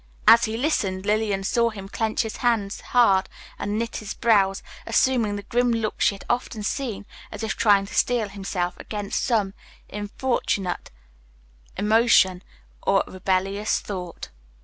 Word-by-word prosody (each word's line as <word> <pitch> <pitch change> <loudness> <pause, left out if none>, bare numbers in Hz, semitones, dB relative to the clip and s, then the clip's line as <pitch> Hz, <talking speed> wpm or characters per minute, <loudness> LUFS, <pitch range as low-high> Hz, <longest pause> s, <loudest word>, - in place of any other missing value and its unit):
As 230 +1 +8
he 220 0 -3
listened, 200 -9 -1
Lillian 210 -2 0
saw 235 +4 +2
him 200 -3 -8
clench 220 +3 -1
his 220 - -6
hand 225 -5 +1
hard 200 -6 +4 0.3
and 205 +1 -2
knit 230 0 -3
his 215 -1 -6
brows, 195 -4 +2 0.2
assuming 230 -2 +2
the 205 - -6
grim 245 +4 +1
look 225 -2 -2
she 200 - +3
had 195 - -13
often 240 -3 -2
seen, 215 -3 -3 0.3
as - - -7
if 220 -3 -2
trying 200 -2 +4
to 200 - -11
steel 240 -3 +1
himself 190 -3 -3
against 205 -2 -3
some 210 -5 +1 0.4
importunate 205 -3 -2 0.9
emotion 210 -3 +4 0.4
or 195 0 +2
rebellious 195 +2 -1
thought. 180 -4 -7
210 Hz, 145 wpm, -24 LUFS, 195-230 Hz, 0.9 s, As